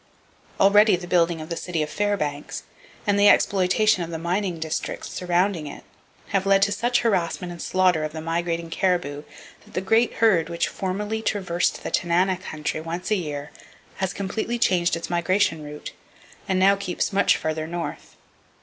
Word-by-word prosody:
Already 205 +1 +6
the 175 0 -6
building 170 -2 +2
of 155 - -8
the 170 - -2
city 165 -2 -2
of 150 - -5
Fairbanks, 150 -9 -2 0.4
and 205 -1 +2
the 205 0 +7
exploitation 195 +1 +3
of 165 - -6
the 165 - -4
mining 175 +2 -1
districts 160 0 -4
surrounding 180 -2 0
it, 145 - -9 0.5
have 195 -1 0
led 195 0 +5
to 200 - +2
such 240 +4 +1
harassment 180 -4 0
and 170 -1 -8
slaughter 185 -4 +2
of 155 - -3
the 160 - -6
migrating 165 +1 -2
caribou 175 -7 0 0.4
that - - -17
the - - +1
great 225 +5 +2
herd 185 -8 +3
which 170 0 0
formerly 205 +3 -3
traversed 185 -5 -1
the - - -4
Tanana 180 +2 +2
country 155 -3 -4
once 170 +5 -5
a - - +5
year 150 -5 -4 0.5
has 190 -1 -1
completely 220 +5 -3
changed 180 -7 +2
its 165 - -5
migration 175 -2 +1
route, 150 0 -8 0.6
and 190 - +2
now 195 +2 +5
keeps 195 -1 -2
much 200 - +4
farther 155 0 -3
north. 170 0 -6
180 Hz, 170 wpm, -24 LUFS, 165-200 Hz, 0.6 s, the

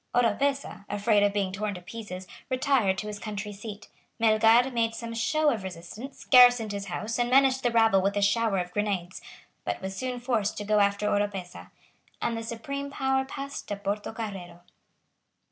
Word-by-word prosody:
Oropesa, 255 +1 +1
afraid 205 0 +2
of 205 0 +3
being 200 -2 -1
torn 205 +1 -3
to 180 - -8
pieces, 190 -2 -7 0.2
retired 255 -7 +2
to 210 - -4
his 210 -1 -6
country 210 -1 -5
seat. 205 +1 -9 0.3
Melgar 225 +3 +4
made 230 -1 0
some 230 0 -6
show 305 +6 +2
of 225 -6 -2
resistance, 190 +8 -9
garrisoned 245 -4 +7
his 200 -1 -4
house, 215 +5 -3
and 240 0 +1
menaced 265 0 +4
the 245 - +2
rabble 225 -4 +4
with 200 +2 0
a - - +1
shower 215 0 +2
of 180 -1 -2
grenades, 195 -4 -2 0.4
but - - -3
was 190 0 -5
soon 255 +2 -3
forced 230 -4 -1
to 210 - -3
go 210 +1 +2
after 200 +1 +2
Oropesa; 205 -3 -2 0.5
and 230 - -1
the 225 - -3
supreme 275 +5 -5
power 265 -1 0
passed 275 +1 -7
to 205 - -2
Portocarrero. 200 -3 -5
215 Hz, 175 wpm, -27 LUFS, 200-245 Hz, 0.5 s, garrisoned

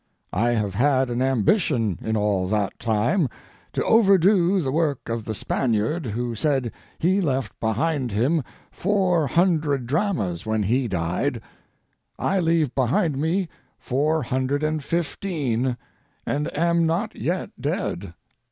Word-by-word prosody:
I 120 +2 +2
have 105 -4 -1
had 130 +2 +2
an 120 +1 -1
ambition 125 - +1
in 110 0 -1
all 100 -3 +1
that 105 0 -1
time 120 - +1 0.4
to - - -1
overdo 195 -3 +4
the 135 -6 -1
work 150 -4 -1
of 115 -1 -3
the 110 - -3
Spaniard 120 - -1
who 120 +2 -2
said 130 -1 0 0.3
he 185 +4 +2
left 135 - -2
behind 130 +3 0
him 130 +9 +1 0.3
four 185 -5 +1
hundred 155 -5 +1
dramas 135 - -1
when 110 -1 0
he 120 +5 +1
died. 85 -4 -1 0.8
I 195 - +1
leave 165 -5 +1
behind 135 - +1
me 175 +4 0 0.3
four 150 +4 0
hundred 130 +4 -1
and 155 -1 -1
fifteen, 140 - -1 0.5
and 145 +1 -1
am 170 0 +2
not 195 +7 -1
yet 180 +2 -2
dead. 85 -1 -3
135 Hz, 135 wpm, -24 LUFS, 115-170 Hz, 0.8 s, overdo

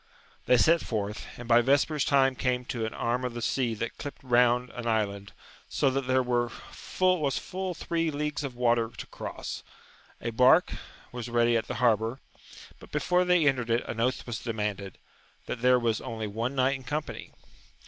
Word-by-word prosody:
They 125 - +6
set 165 +7 +4
forth, 105 -2 -4
and 120 - -9
by 120 0 +6
vespers 140 +3 +2
time 135 -2 +3
came 125 -1 -1
to 115 -3 -3
an - - -7
arm 120 +2 -1
of 125 -2 -3
the - - -3
sea 120 -2 0
that 115 +2 -5
clipped 145 - -7
round 125 0 +3
an 120 -1 -6
island, 100 -3 -1 0.4
so 135 - +2
that 135 -1 -2
there 130 0 +3
was 120 -1 0 0.9
full 185 0 -4
three 165 0 -1
leagues 150 0 -3
of 135 -3 -5
water 120 -2 +2
to - - -6
cross; - - -6 0.6
a 115 - -3
bark 125 +9 +5 0.4
was 120 -1 -6
ready 120 0 +3
at 115 - 0
the - - -4
harbour, 115 +1 +1 0.6
but - - -15
before 180 0 +2
they 180 -3 +3
entered 125 -4 +1
it 115 +1 +1
an 115 - -5
oath 125 +3 0
was 120 -3 -4
demanded, 105 -4 -4 0.5
that 115 - -5
there 125 0 +5
was 115 -3 0
only 115 -4 -5
one 115 +6 -3
knight 130 +1 +2
in 130 - -14
company. 150 +5 -5
125 Hz, 180 wpm, -28 LUFS, 115-135 Hz, 0.9 s, They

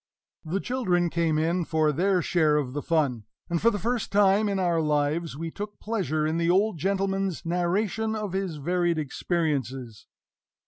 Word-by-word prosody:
The 170 +5 -2
children 180 -9 0
came 165 -2 +1
in 170 +3 +1
for 155 -2 +1
their 180 +4 +1
share 155 -4 +2
of 130 -4 -2
the 145 - -2
fun; 140 -10 0 0.3
and 170 - 0
for 230 - +5
the 220 - -2
first 235 +3 -2
time 205 +1 +4
in 200 - 0
our 175 -3 +1
lives 150 +1 0
we 165 +1 -4
took 205 +2 -7
pleasure 155 - -1
in 160 +1 0
the 170 0 +1
old 190 0 +2
gentleman's 195 -1 -1
narration 195 +6 0
of 210 -4 -4
his 190 -4 -2
varied 175 +3 0
experiences. 135 - -2
175 Hz, 170 wpm, -26 LUFS, 155-195 Hz, 0.3 s, for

